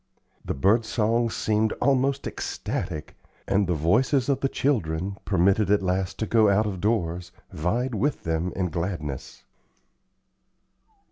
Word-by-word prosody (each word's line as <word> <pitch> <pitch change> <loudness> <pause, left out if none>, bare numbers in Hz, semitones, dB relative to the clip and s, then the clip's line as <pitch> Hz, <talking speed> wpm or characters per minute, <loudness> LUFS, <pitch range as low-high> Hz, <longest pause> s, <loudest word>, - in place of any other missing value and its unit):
The - - -3
bird 105 - +3
songs 115 +1 0
seemed 110 0 +1
almost 140 0 +1
ecstatic, 80 -4 -4 0.3
and 100 -1 +2
the 90 - +1
voices 120 - +2
of 140 - +2
the 135 - 0
children, 95 - -1
permitted 95 +1 +2
at 100 -1 +3
last 95 0 -1
to 110 - -1
go 110 -2 +4
out 105 +2 +3
of 95 -4 -4
doors, 90 -5 -1 0.2
vied 120 +11 -1
with 125 +8 -1
them 80 +2 -1
in 90 -2 -1
gladness. 85 -5 -4
100 Hz, 135 wpm, -25 LUFS, 90-115 Hz, 0.3 s, go